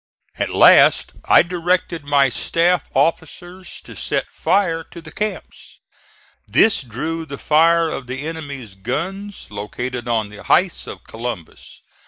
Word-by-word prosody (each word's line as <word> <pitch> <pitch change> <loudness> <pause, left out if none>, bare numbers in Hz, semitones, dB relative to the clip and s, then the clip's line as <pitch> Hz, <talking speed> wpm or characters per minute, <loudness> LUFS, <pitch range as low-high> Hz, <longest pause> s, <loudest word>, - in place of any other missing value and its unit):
At - - 0
last - - +6
I - - +6
directed 175 -2 -1
my 140 -1 +3
staff 170 +7 +1
officers 175 +3 -2
to - - -12
set - - -2
fire 165 -5 0
to 170 - -12
the 160 -1 -12
camps. 215 +5 -6 0.7
This 220 - +4
drew 150 +7 -4
the 140 -3 -8
fire 165 +3 +3
of 130 -4 -6
the 130 +3 -5
enemy's 140 -9 -7
guns 170 - -5
located 120 +4 -5
on 110 -3 0
the 105 -1 -12
heights 185 -1 +1
of - - -9
Columbus. 115 -7 -8
160 Hz, 135 wpm, -20 LUFS, 125-175 Hz, 0.7 s, last